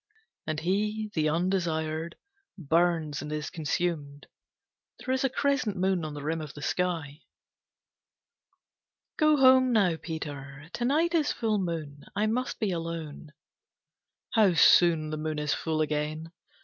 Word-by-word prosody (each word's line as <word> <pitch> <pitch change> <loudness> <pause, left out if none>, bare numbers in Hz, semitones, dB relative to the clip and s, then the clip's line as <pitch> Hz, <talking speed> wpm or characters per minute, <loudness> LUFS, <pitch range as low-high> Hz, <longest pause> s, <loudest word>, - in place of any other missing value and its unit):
And 155 -1 -2
he, 210 +4 -1
the 155 -2 +1
undesired, 165 -2 -1 0.4
burns 165 -2 +1
and 150 - -6
is 150 0 -4
consumed. 150 -2 -3 0.7
There 260 - -3
is 260 - 0
a 270 - +2
crescent 270 -7 0
moon 185 -2 +1
on 155 -1 -5
the 145 - -7
rim 160 +2 -2
of 150 -2 -8
the 145 - -9
sky. 180 0 0 0.2
III - - -35 2.0
"Go 305 -1 +4
home, 260 -1 +6
now, 190 -8 +3
Peter. 145 -2 -7
To 240 - -2
night 320 +6 +2
is 310 -3 +2
full 220 -3 0
moon. 155 -6 -4
I 210 +2 +1
must 245 +4 -1
be 210 -3 0
alone." 165 -3 -5 1.0
"How 210 -6 +4
soon 165 -2 +5
the 155 - -3
moon 155 0 -3
is 150 -1 0
full 160 -1 -1
again! 155 +1 -2
165 Hz, 145 wpm, -28 LUFS, 155-210 Hz, 2.0 s, home